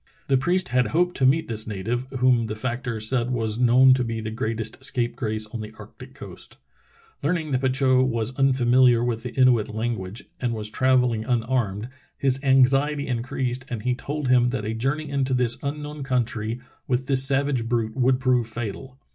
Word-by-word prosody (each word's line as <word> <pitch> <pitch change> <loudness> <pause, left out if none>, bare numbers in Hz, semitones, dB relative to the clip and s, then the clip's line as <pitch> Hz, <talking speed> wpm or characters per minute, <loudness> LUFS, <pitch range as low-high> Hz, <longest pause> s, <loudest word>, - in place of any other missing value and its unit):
The 135 - +4
priest 180 +7 0
had 125 0 +2
hoped 175 +2 0
to 130 - +3
meet 155 +5 +2
this 110 -1 -2
native, 115 +5 -3
whom 125 -2 +2
the 110 - -4
factor 120 0 -4
said 120 +2 +1
was 115 -3 -2
known 125 +2 +6
to 130 -1 +1
be 115 -1 -4
the 110 0 -5
greatest 110 +2 -3
scapegrace 120 -4 -1
on 115 - -4
the 105 0 -8
arctic - - -13
coast. - - -11 0.6
Learning 160 0 -1
that 130 -1 0
Petitot 130 -1 +2
was 115 0 -2
unfamiliar 130 -2 +3
with 120 -2 -2
the 125 0 -6
Inuit 125 -5 +3
language, 110 -2 -4 0.2
and 120 -2 -2
was 105 -1 -3
travel 130 0 +2
ling 110 -1 -3
unarmed, 115 -3 -1 0.3
his 135 0 +1
anxiety 135 +2 +3
increased 125 +1 -3
and 115 -5 -5
he 125 0 +1
told 145 +2 -4
him 125 -1 +4
that 120 -4 -3
a 110 - -2
journey 135 +7 -2
into 135 -2 -1
this 125 -1 0
unknown 150 +1 -5
country 120 -3 -2 0.3
with 130 0 -1
this 135 -1 +4
sav 135 +1 +4
age 120 -5 -2
brute 115 -2 -1
would 130 -1 +2
prove 125 -3 +1
fatal. 120 +4 -7
125 Hz, 185 wpm, -24 LUFS, 115-130 Hz, 0.6 s, known